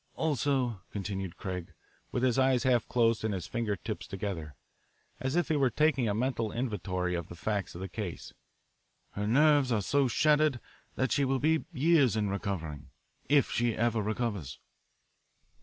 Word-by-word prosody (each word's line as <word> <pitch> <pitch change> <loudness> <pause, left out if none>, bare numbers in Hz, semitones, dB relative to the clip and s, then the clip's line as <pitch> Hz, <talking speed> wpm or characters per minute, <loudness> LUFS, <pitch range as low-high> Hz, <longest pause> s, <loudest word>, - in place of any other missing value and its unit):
"Also," 135 - 0
continued 95 -3 -4
Craig, 90 -2 -5 0.4
with 125 - -1
his 130 0 +3
eyes 130 -2 +3
half 125 -3 +2
closed 115 -3 +2
and 110 -2 0
his 90 -3 -4
finger 115 -3 -2
tips 90 - -6
together, 90 -7 -5 0.6
as 130 +3 -2
if, 175 - +1
he 160 - +2
were 135 -3 +3
taking 135 -3 +2
a 100 - 0
mental 115 -2 -1
inventory 90 -7 -2
of 85 -1 -3
the 85 - -9
facts 100 +1 -2
in 85 - -7
the 95 - -3
case, 95 -2 -6 0.8
"her 105 +1 -3
nerves 145 +2 +4
are 110 - +2
so 140 +7 +2
shattered 150 0 +3 0.4
that 130 0 0
she 140 - +2
will 135 0 +1
be 155 +3 +1
years 140 -5 +3
in 105 -2 0
recovering, 90 -7 -4 0.4
if 145 -2 +4
she 120 -2 +1
ever 115 -1 +1
recovers." 105 - -3
115 Hz, 165 wpm, -30 LUFS, 100-135 Hz, 0.8 s, nerves